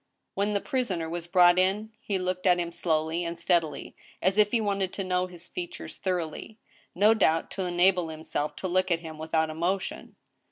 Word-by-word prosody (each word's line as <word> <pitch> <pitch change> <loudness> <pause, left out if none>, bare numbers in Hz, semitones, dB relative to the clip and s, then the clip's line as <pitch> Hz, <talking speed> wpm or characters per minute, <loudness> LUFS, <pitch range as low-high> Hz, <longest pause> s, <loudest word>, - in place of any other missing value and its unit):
When 205 +1 0
the 200 - 0
prisoner 210 - -1
was 170 +1 -5
brought 175 0 +6
in, 200 +4 +1
he 200 - -2
looked 185 0 -2
at 180 -1 +5
him 170 -1 -2
slowly 160 0 0
and 170 0 -4
steadily, 170 -2 0 0.2
as 190 +3 +1
if 210 -1 +5
he 235 - +1
wanted 200 -3 -1
to 195 - -3
know 180 0 0
his 175 -1 -10
features 175 -1 -7
thoroughly, 180 +3 -3 0.4
no 210 +4 +5
doubt 165 -7 +2
to 190 - -3
enable 180 -1 +2
himself 155 -1 -3
to 190 - -4
look 185 +1 +1
at 170 -1 +1
him 160 -2 -9
without 160 0 0
emotion. 175 +5 -3
180 Hz, 190 wpm, -27 LUFS, 170-195 Hz, 0.4 s, brought